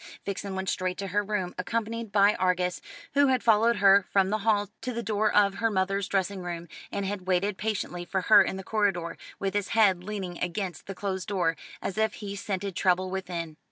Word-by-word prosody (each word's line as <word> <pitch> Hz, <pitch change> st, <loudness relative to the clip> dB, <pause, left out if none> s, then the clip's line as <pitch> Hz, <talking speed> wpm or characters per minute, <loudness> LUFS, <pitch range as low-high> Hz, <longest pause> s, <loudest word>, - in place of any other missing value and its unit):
Vixen 200 Hz, 0 st, -4 dB
went 190 Hz, 0 st, -3 dB
straight 185 Hz, 0 st, -1 dB
to 195 Hz, -1 st, -4 dB
her 205 Hz, +3 st, +1 dB
room, 200 Hz, -3 st, -2 dB
accompanied 230 Hz, +3 st, -2 dB
by 200 Hz, +1 st, +5 dB
Argus, 180 Hz, -1 st, 0 dB, 0.3 s
who 285 Hz, 0 st, +5 dB
had 260 Hz, -2 st, +2 dB
followed 230 Hz, +1 st, +4 dB
her 195 Hz, 0 st, +6 dB
from 195 Hz, -1 st, +3 dB
the 215 Hz, -, +1 dB
hall 205 Hz, -1 st, +1 dB
to 250 Hz, +2 st, -3 dB
the 235 Hz, 0 st, -3 dB
door 215 Hz, 0 st, +1 dB
of 200 Hz, -1 st, +4 dB
her 230 Hz, -, +2 dB
mother's 195 Hz, 0 st, 0 dB
dressing 195 Hz, 0 st, -1 dB
room, 175 Hz, -1 st, -5 dB, 0.2 s
and 200 Hz, -, -2 dB
had 190 Hz, -2 st, -4 dB
waited 190 Hz, +2 st, +1 dB
patiently 190 Hz, -4 st, -3 dB
for 190 Hz, +2 st, -2 dB
her 210 Hz, +3 st, +7 dB
in 190 Hz, -, -1 dB
the 190 Hz, -, -6 dB
corridor, 190 Hz, -6 st, 0 dB, 0.2 s
with 195 Hz, -1 st, -2 dB
his 205 Hz, -1 st, 0 dB
head 190 Hz, -5 st, +4 dB
leaning 190 Hz, -3 st, -5 dB
against 180 Hz, -2 st, -3 dB
the 195 Hz, -, -5 dB
closed 190 Hz, -1 st, -3 dB
door, 180 Hz, -5 st, +1 dB, 0.3 s
as 200 Hz, -, -3 dB
if 220 Hz, 0 st, +1 dB
he 200 Hz, -1 st, -6 dB
scented 195 Hz, -1 st, -3 dB
trouble 185 Hz, 0 st, +2 dB
within. 170 Hz, -4 st, -4 dB
195 Hz, 205 wpm, -28 LUFS, 185-210 Hz, 0.3 s, her